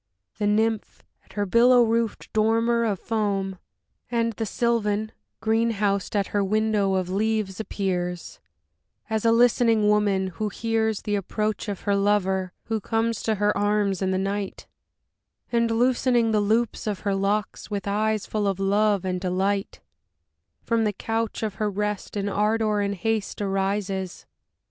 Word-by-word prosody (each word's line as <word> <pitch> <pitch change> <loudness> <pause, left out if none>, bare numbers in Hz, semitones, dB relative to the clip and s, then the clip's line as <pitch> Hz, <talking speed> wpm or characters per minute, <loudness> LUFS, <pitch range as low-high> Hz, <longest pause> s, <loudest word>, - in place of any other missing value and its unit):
The 205 - +1
Nymph, 220 +1 0 0.2
at - - -19
her 205 -1 -1
billow 240 +4 +5
roofed 230 -1 -1
dormer 230 +2 +2
Of 205 -3 0
foam; 195 -4 -1 0.5
and 230 -1 0
the 220 +1 -3
Sylvan 220 -2 0 0.3
green 225 +1 +2
housed 200 -1 -1
at 200 -1 +1
her 205 -1 +2
window 210 -1 +1
of 185 -1 -1
leaves 215 -1 -1
appears; 180 -4 -3 0.7
As 220 0 0
a 230 - +5
listening 230 -2 +4
woman, 205 -2 +2
who 210 +5 -3
hears 220 0 -1
The 210 - -2
approach 210 +2 -2
of 200 - -4
her 200 - +1
lover, 190 -2 +1
who 225 -2 -2
comes 225 +1 -1
to 220 - 0
her 205 +1 +1
arms 205 -2 +1
in 190 - +1
the 190 - +1
night; 195 +1 -3 0.9
And, 235 -1 +2
loosening 240 0 +2
the 210 -1 +2
loops 220 +2 0
of 205 -2 -2
her 200 -2 0
locks, 200 +2 -1
With 205 -1 -4
eyes 215 +1 0
full 210 -2 -1
of 195 -1 -1
love 200 0 +2
and 180 -1 -2
delight, 195 +2 -1 0.8
From 230 -1 +1
the 210 -1 0
couch 225 +2 -2
of 215 -2 -1
her 210 - +2
rest 210 +1 -3
in 200 0 -1
ardor 210 +1 +1
and 200 0 -1
haste 220 +2 -2
arises. 195 -1 -2
210 Hz, 155 wpm, -25 LUFS, 195-225 Hz, 0.9 s, billow